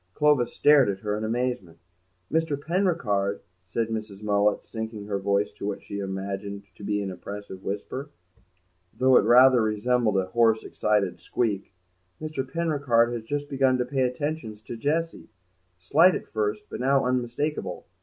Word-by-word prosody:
Clovis 150 -5 +3
stared 145 -6 +5
at 95 -1 -3
her 105 -1 -1
in 105 - -4
amazement. 115 -7 -2 0.6
"Mr. 160 -3 +1
Penricarde," 145 - 0 0.3
said 115 +5 -1
Mrs. 110 -2 -5
Mullet, 105 0 +2
sinking 110 -2 -6
her 100 -1 -2
voice 100 +1 +1
to 100 - -6
what 105 - -4
she 100 - -6
imagined 100 +1 -4
to 105 - -14
be 105 0 -1
an 95 - -4
impressive 95 +1 -8
whisper, 130 +8 -4 0.9
though 130 0 +4
it - - +8
rather 125 0 +7
resembled 110 0 +1
a 95 - +1
hoarse, 110 +3 +2
excited 105 -3 0
squeak, 105 -6 -2 0.5
"Mr. 155 -3 -3
Penricarde 140 -8 +2
has 120 - -3
just 145 +5 -3
begun 135 -2 +2
to 125 - 0
pay 130 +1 -1
attentions 125 -4 -2
to 115 - -7
Jessie. 160 +7 -2 0.5
Slight 155 - +4
at - - -5
first, 105 0 -2
but - - -7
now 135 +1 +2
unmistakable. 125 +4 -2
115 Hz, 155 wpm, -26 LUFS, 100-135 Hz, 0.9 s, it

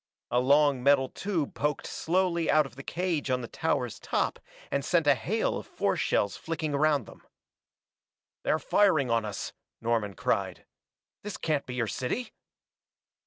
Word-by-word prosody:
A 120 - +3
long 140 0 +4
metal 135 0 +4
tube 180 -8 -2
poked 150 0 -1
slowly 170 -1 0
out 155 -1 +5
of 130 -3 -11
the 135 - -8
cage 165 -2 -2
on 125 0 +1
the 120 - -5
tower's - - -1
top - - -1 0.3
and 140 - 0
sent 165 +1 +2
a 145 - +7
hail 210 - -1
of - - -11
force - - 0
shells 100 - +1
flicking 160 -2 -3
around 145 -3 +2
them. - - -14 1.2
"They're - - +2
firing 160 - +3
on 115 -1 +2
us!" 105 -2 -5 0.3
Norman 115 -4 0
cried. - - -1 0.6
"This 210 0 -6
can't 150 -3 -1
be 125 - -5
your 120 -2 +1
city!" 130 - -3
145 Hz, 160 wpm, -29 LUFS, 125-165 Hz, 1.2 s, a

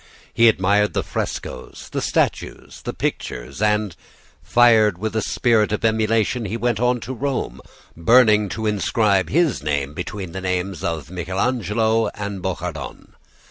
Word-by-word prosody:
He 115 0 +6
admired 105 0 +2
the - - 0
statues, 65 - -5
the - - -2
frescoes, - - -2
the - - -2
pictures; 65 - -4
and, 105 -3 +1 0.5
fired 110 -5 +4
with 110 +3 -4
a 110 - +1
spirit 110 -3 +2
of 105 +1 -1
emulation, 110 +1 +1
he 105 +3 -3
went 120 -1 0
on 125 0 +2
to 130 - -5
Rome, 135 +1 -3 0.3
burning 105 +2 +4
to 110 +4 -4
inscribe 105 -2 +1
his 165 -2 +1
name 70 -1 -2
between 90 +2 -6
the 95 - -6
names 90 -1 -2
of 80 -2 -3
Michelangelo 110 +4 0
and 100 -2 -5
Bouchardon. 90 -4 -5
105 Hz, 140 wpm, -21 LUFS, 95-115 Hz, 0.5 s, He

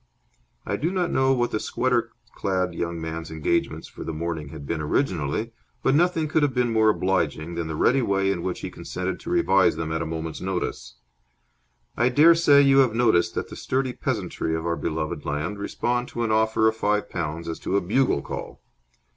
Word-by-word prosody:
I - - -1
do 165 - 0
not 180 -2 -1
know 130 0 +3
what 120 -2 +1
the 110 - -1
sweater 125 0 0 0.2
clad 90 -2 -1
young 85 0 -3
man's 80 0 -5
engagements 80 -1 -1
for - - -9
the - - -4
morning 80 -2 -4
had 75 -2 -9
been 80 +2 -2
originally, 90 - -1 0.3
but 135 - +3
nothing 165 0 +2
could 155 +1 +1
have 140 -3 +1
been 120 -2 +1
more 110 -1 +4
obliging 85 -5 0
than 85 -1 -3
the 80 - -4
ready 130 - +3
way 100 -3 +1
in 90 -3 -2
which 90 0 -3
he - - -5
consented 90 0 -4
to - - -8
revise 95 - +3
them 80 -1 -3
at 80 +1 -1
a 80 - -2
moment's 80 0 -5
notice. 90 -10 -3 1.0
I 120 - +3
dare 150 +7 +7
say 145 -4 +5
you 135 0 +5
have 125 -5 +3
noticed 110 -8 +3
that - - -3
the - - -8
sturdy 130 -1 -1
peasantry 80 - -2
of 80 +1 -4
our 85 0 0
beloved 75 0 -3
land 75 +8 -3
respond 120 +4 -1
to 120 - -3
an 115 - 0
offer 110 0 +3
of 110 - +2
five 105 -1 0
pounds 85 -1 -4
as 85 - -4
to 100 - 0
a - - +1
bugle 105 - +1
call. - - -7
95 Hz, 205 wpm, -24 LUFS, 80-125 Hz, 1.0 s, dare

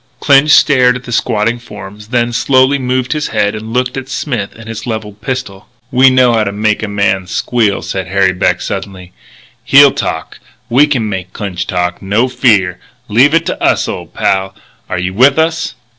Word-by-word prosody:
Clinch 140 +1 +4
stared 130 -4 +4
at 125 - -7
the 120 - -9
squatting 115 +1 0
forms, 105 -2 -11
then 120 0 -1
slowly 130 +3 +2
moved 130 0 -1
his 150 -1 -2
head 105 -2 0
and 110 +1 -7
looked 125 +1 -1
at 130 -1 -6
Smith 120 -10 -4
and 115 0 -12
his 115 +1 -7
levelled 110 -2 -6
pistol. 110 -6 -5 0.2
"We 130 +1 +5
know 130 -2 +3
how 110 -1 +2
to 100 - -2
make 105 +1 0
a 110 - -3
man 100 -2 -1
squeal," 105 +2 -1
said 95 -3 -4
Harry 95 0 +1
Beck 90 0 0
suddenly. 95 -2 -6 0.5
"He'll - - +6
talk. - - -5 0.3
We 140 +5 +5
can 125 -7 -1
make 95 -2 -5
Clinch 95 -4 -5
talk, 90 -1 -2
no 105 +6 +1
fear! 110 -8 +1 0.3
Leave 130 +9 +4
it 165 0 +1
to - - -4
us, - - +2
old - - -7
pal. 95 0 -1 0.3
Are 90 - -2
you 90 +1 -3
with 130 +7 +4
us?" 160 0 -1
110 Hz, 190 wpm, -13 LUFS, 100-130 Hz, 0.5 s, He'll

